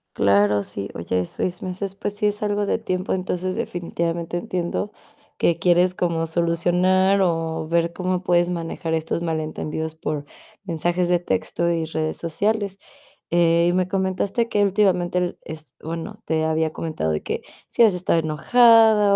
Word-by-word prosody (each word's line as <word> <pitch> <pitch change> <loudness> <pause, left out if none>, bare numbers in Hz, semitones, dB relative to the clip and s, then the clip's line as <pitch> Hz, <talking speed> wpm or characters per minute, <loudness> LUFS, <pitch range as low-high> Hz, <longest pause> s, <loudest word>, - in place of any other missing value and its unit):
Claro, 100 +1 +3
sí. 100 0 -6
Oye, 90 +2 -1
6 180 - -4
meses, 190 +1 -4
pues, 200 +1 -4
sí 210 0 -2
es 210 0 0
algo 205 0 0
de - - +1
tiempo. 185 +1 -2
Entonces, 185 0 -2
definitivamente 170 -1 -3
entiendo 180 +3 -3 0.5
que 170 - +2
quieres 180 +1 +3
como 165 -2 0
solucionar 180 +4 +2
o 165 -3 0
ver 170 0 +1
cómo 185 0 -1
puedes 175 -1 +2
manejar 165 -1 -3
estos 160 +1 -1
malentendidos 160 -1 -3
por 150 -2 -4 0.4
mensajes 175 0 0
de 175 0 +3
texto 170 - -1
y 165 -1 0
redes 155 0 -3
sociales. 200 +4 -1 0.5
Eh, 170 0 +3
y - - +1
me 185 0 +1
comentaste 190 +4 -1
que 205 -3 +1
últimamente 185 -3 +2
r 180 0 -2
es 160 0 -8 0.2
bueno, 165 +1 -6
te 160 -1 0
había 160 0 0
comentado 155 - -2
de 75 - -3
que - - -3 0.3
si - - 0
habías 220 -4 +7
estado 180 -2 +1
enojada 215 - +5
175 Hz, 155 wpm, -23 LUFS, 160-185 Hz, 0.5 s, habías